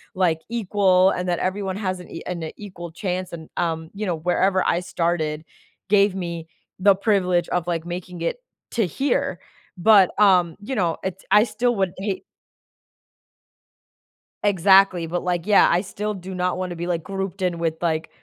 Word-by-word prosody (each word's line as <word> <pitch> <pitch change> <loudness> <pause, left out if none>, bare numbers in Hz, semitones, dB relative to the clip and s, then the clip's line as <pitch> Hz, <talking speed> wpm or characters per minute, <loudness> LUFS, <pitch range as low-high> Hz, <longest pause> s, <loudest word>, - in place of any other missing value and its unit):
like, 170 -4 +2
equal 195 -4 +3
and 180 -1 -3
that 175 -1 0
everyone 190 0 -2
has 185 -3 -3
an 180 - -12
e 165 - -7
an 170 -3 -4
equal 175 -5 -9
chance 185 -1 -3
and, 160 -2 -8
um, 160 -1 -2
you 210 +2 -4
know, 175 -4 0
wherever 185 +3 +1
I 170 - +2
started, 165 -3 -1 0.5
gave 200 -1 +4
me 170 -3 -5 0.3
the 195 0 +5
privilege 185 -4 +1
of, 175 -2 -1
like, 170 -1 -2
making 175 0 -6
it 170 - -1 0.3
to 225 -4 +1
here, 185 - -1 0.4
but, 195 0 +6
um, 180 -5 +4
you 260 +6 -4
know, 175 -6 0
it's 190 0 -5
I 210 +1 +7
still 245 0 0
would 190 -3 0
hate 195 0 -3 2.2
Exactly, 190 -2 +4
but, 175 +2 -3
like, 175 -1 -1
yeah, 210 -1 +6
I 175 +2 +3
still 210 +2 -4
do 190 0 -8
not 180 0 -1
wanna 180 -1 -4
be 175 +1 -4
like 170 -3 -1
grouped 195 -1 -5
in 175 -2 0
with 165 -1 0
like, 160 -1 -1
180 Hz, 170 wpm, -23 LUFS, 170-195 Hz, 2.2 s, I